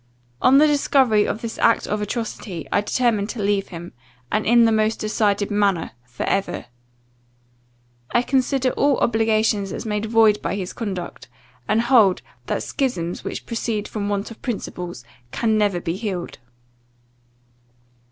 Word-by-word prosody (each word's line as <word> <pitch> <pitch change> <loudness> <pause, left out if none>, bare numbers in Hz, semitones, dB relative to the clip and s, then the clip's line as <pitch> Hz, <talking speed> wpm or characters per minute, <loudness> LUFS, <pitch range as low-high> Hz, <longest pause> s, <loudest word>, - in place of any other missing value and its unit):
On 260 +2 +6
the 300 - +7
discovery 270 -7 +3
of 215 - -3
this 230 - -5
act 230 - +3
of 210 0 -2
atrocity, 210 -5 -4
I 205 - +3
determined 215 -1 0
to 240 - -5
leave 200 -1 +1
him, 175 -1 -9 0.4
and 215 - 0
in 235 +1 +6
the 225 - +3
most 215 0 +1
decided 210 -1 0
manner, 200 -5 +1 0.2
for 120 -1 -6
ever. 195 0 -1 1.5
I 240 - +3
consider 265 0 +1
all 280 -2 +2
obligations 220 -3 +1
as - - -5
made 210 0 -2
void 220 -2 +4
by - - -2
his 185 -2 -4
conduct; 190 - -5 0.4
and 215 +2 +2
hold, 230 -7 +4 0.2
that - - -1
schisms 180 - -2
which - - -5
proceed 225 -2 -2
from 205 -2 -3
want 205 +2 -2
of 225 - -12
principles, 180 - -5 0.3
can 220 - +1
never 205 -4 +2
be 170 0 -3
healed. 190 -4 -5
215 Hz, 150 wpm, -22 LUFS, 200-230 Hz, 1.5 s, the